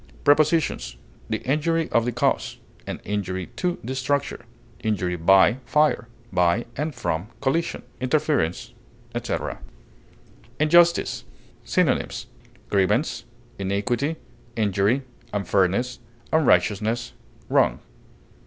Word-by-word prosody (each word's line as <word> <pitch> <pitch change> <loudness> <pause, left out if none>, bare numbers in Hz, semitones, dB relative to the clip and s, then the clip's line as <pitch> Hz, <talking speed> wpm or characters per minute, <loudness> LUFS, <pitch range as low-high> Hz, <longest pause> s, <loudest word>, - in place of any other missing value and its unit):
Prepositions: 155 +1 +2 0.3
The 110 -1 -2
injury 160 +4 +1
of 115 0 +3
the 125 - 0
cause; - - 0 0.3
an - - -4
injury 95 -2 -2
to 180 -1 0
the 125 +4 -3
structure; 140 +2 -1 0.3
injury 95 -5 -1
by 95 +7 +5
fire; 150 -1 +2 0.3
by 90 +5 +2
or 150 +3 -2
from 105 - -2
collision, 165 +5 -1 0.2
interference, 130 - 0 0.4
etc. - - -3 1.0
INJUSTICE. 170 +3 +4 0.4
Synonyms: - - 0 0.4
grievance, 105 - +1 0.3
injury, 115 - -1 0.3
unfairness, 100 +6 +1 0.3
unrighteousness, 115 -6 +2 0.3
wrong. - - +3
120 Hz, 90 wpm, -24 LUFS, 100-150 Hz, 1.0 s, by